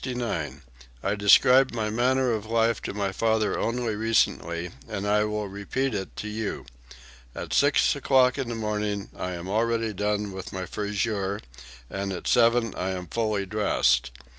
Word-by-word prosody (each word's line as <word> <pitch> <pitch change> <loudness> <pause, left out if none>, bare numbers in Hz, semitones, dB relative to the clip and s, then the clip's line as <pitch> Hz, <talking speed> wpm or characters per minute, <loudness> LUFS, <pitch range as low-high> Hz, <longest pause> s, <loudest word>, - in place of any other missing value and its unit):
"I 100 - +1
described 125 +6 +5
my 110 -2 -1
manner 125 +2 +2
of 110 -1 -2
life 115 0 +1
to - - -5
my 100 -2 -1
father 110 +1 +1
only 115 -2 -1
recently, 85 -6 0 0.2
and 105 -2 -3
I 105 +1 +3
will 105 0 -2
now 100 - -8
repeat 130 +6 -2
it 95 -2 -4
to 105 - -5
you. 105 0 -4 0.7
At - - -5
six 145 +1 +4
o'clock 130 -2 +3
in 130 -3 -2
the 120 - -3
morning 105 -2 -2
I 90 - -4
am 85 +1 -6
already 115 +2 0
done 105 +1 -1
with 95 -1 -7
my 95 -1 -4
friseur, 100 0 -2 0.5
and 95 +4 -4
at 90 - -5
seven 115 -2 +3
I 95 - -3
am 90 -1 -5
fully 110 -3 -1
dressed. 95 - +2
105 Hz, 165 wpm, -26 LUFS, 100-115 Hz, 0.7 s, described